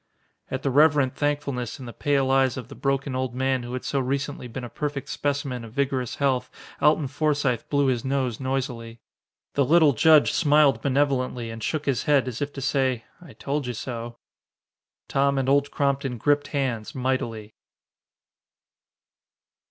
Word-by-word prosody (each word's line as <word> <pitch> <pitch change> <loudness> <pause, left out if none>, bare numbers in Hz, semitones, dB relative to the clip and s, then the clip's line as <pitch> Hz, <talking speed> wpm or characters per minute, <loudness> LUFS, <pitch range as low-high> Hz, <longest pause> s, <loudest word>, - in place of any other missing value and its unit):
At 130 0 -4
the 135 - +1
reverent 145 -2 +4
thankfulness 145 -5 -2
in 130 - -8
the 120 - -8
pale 140 -2 +1
eyes 135 -2 +3
of 125 -2 -7
the - - -9
broken 135 -1 -1
old 130 -1 -2
man 130 0 0
who 120 +1 -7
had 130 - -5
so 140 - 0
recently 135 0 -2
been 125 +2 -7
a - - -4
perfect 145 +2 -4
specimen 140 -4 -2
of 110 -1 -11
vigorous 130 -3 -1
youth, 130 -3 +1 0.3
Alton 150 0 +4
Forsythe 140 -4 0
blew 140 -1 +2
his 125 -3 +1
nose 130 -4 -1
noisily. 125 -3 -3 0.5
The 140 - +3
little 155 +1 +5
judge 155 +5 +5
smiled 150 -3 +4
benevolently 130 -4 0
and 115 0 -8
shook 155 +6 -2
his 135 -5 0
head 140 -3 +3
as 125 0 -5
if 145 0 -2
to 135 - -6
say, 130 -3 0 0.2
"I 165 -8 -13
told 140 +4 -3
you 125 - -3
so." 120 0 -6 0.9
Tom 140 0 +1
and 135 -1 0
Old 140 +1 +3
Crompton 140 -3 -1
gripped 145 +5 +1
hands 130 -3 -2
mightily. 120 -5 -2
135 Hz, 165 wpm, -25 LUFS, 125-145 Hz, 0.9 s, little